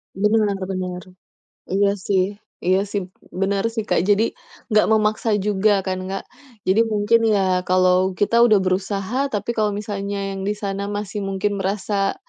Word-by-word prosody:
Bener 210 +2 +2 0.2
bener. 180 -1 -4 0.7
Iya 200 +1 +2
sih 190 -2 +3 0.4
iya 185 +2 +3
sih, 200 -1 -2 0.4
bener 195 +1 0
sih, 220 - -1
Kak. 205 - +1
Jadi 205 +2 +4 0.5
nggak 215 0 +4
memaksa 215 +1 +1 0.2
juga 205 -1 +2
kan, 185 0 -1
Kak. 195 - -3 0.4
Jadi 195 +4 +4
mungkin 215 +1 +2
ya 205 -3 +3 0.3
kalau 185 0 +3
kita 210 +4 +2
udah 215 -3 +5
berusaha 195 +5 -1 0.2
tapi 210 +3 -2
kalau 210 -3 0
misalnya 200 -1 -4
yang 195 - -5
di 210 - 0
sana 200 0 -2
masih 205 0 -4
mungkin 195 +1 -1
merasa 195 +1 -1
200 Hz, 150 wpm, -21 LUFS, 190-210 Hz, 0.7 s, udah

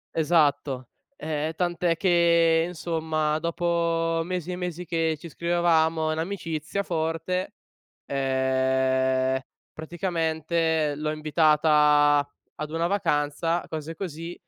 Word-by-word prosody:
Esatto. 145 -5 +1 0.3
Ehm, 155 - -3
tant'è 175 -1 0
che, 170 -3 +3
insomma, 160 -3 -1
dopo 170 0 0
mesi 180 0 -4
e - - -3
mesi 180 -1 -5
che 165 -1 0
ci 170 - -9
scrivevamo 165 -1 +1
in 155 - -2
amicizia 165 0 -3
forte, 165 +2 -2 0.5
ehm, 130 -1 +1 0.4
praticamente 160 -2 -1
l'ho 155 0 -2
invitata 150 -1 +3 0.3
ad 150 0 -6
una 165 +2 0
vacanza, 165 -3 0
cose 160 0 -5
così, 165 -2 -6
160 Hz, 100 wpm, -25 LUFS, 150-170 Hz, 0.5 s, che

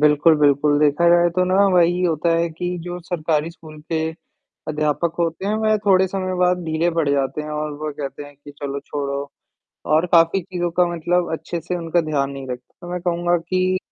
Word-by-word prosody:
बिल्कुल, 150 +2 +5
बिल्कुल। 145 0 +3
देखा 150 +3 +3
जाए 175 0 +5
तो 180 +2 +1
ना, 185 +1 0 0.2
वही 175 +1 +3
होता 165 -1 +1
है 170 0 +1
कि 180 +2 -4
जो 175 0 -5
सरकारी 165 -2 -1
स्कूल 160 -2 -13
के, 160 - +1 0.7
अध्यापक 155 +2 0
होते 170 +2 -1
हैं 210 - 0
वह 215 0 +2
थोड़े 190 -1 +5
समय 185 -1 -3
बाद 180 0 +3
ढीले 160 +2 0
पड़ 155 -3 +2
जाते 140 +1 0
हैं 150 - -7
और 150 0 -3
वो 155 0 -3
कहते 145 0 -5
हैं 145 0 -13
कि 145 +1 -13
चलो 140 0 -4
छोड़ो 140 0 -4 0.6
और 160 +3 +3
काफ़ी 165 +3 +5
चीज़ों 175 -1 -3
का 180 - +5
मतलब 175 +1 0
अच्छे-से 170 +2 -4
उनका 170 0 0
ध्यान 145 -4 -1
नहीं 135 -1 -7
रख 125 -1 -3 0.2
तो 175 - -8
मैं 180 0 -3
कहूँगा 175 0 +1
कि, 185 +2 0
165 Hz, 200 wpm, -21 LUFS, 150-175 Hz, 0.7 s, बिल्कुल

